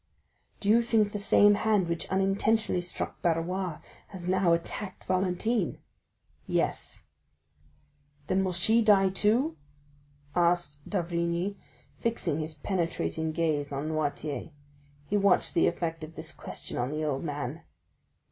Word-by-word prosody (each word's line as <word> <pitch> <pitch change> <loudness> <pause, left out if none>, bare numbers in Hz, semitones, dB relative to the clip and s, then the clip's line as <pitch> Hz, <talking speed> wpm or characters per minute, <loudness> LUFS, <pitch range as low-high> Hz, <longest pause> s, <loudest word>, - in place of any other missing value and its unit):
"Do - - -5
you 225 +3 +6
think 225 -3 +2
the 210 - -3
same 205 +1 +6
hand 205 -3 +2
which 170 0 -2
unintentionally 195 +1 +2
struck 175 - -5
Barrois 175 0 0 0.3
has 180 -3 -8
now 185 -1 +3
attacked 185 +4 -2
Valentine?" 185 +2 0 0.7
"Yes." - - -1 1.2
"Then 185 +4 +1
will 185 - 0
she 220 +6 +3
die 200 -3 +5
too?" 225 - +1 0.8
asked 175 -4 +2
d'Avrigny, 170 +1 -1 0.4
fixing 230 -10 0
his 155 0 -4
penetrating 165 -1 -1
gaze 155 -3 0
on 140 +3 -3
Noirtier. 150 -3 -2 0.6
He 205 - 0
watched 200 -2 +3
the 170 - +4
effect 165 -2 -2
of 155 +1 -9
this - - -5
question - - -6
on 120 +1 0
the 155 +2 -2
old 145 -1 -1
man. 145 -1 -4
180 Hz, 130 wpm, -29 LUFS, 160-200 Hz, 1.2 s, you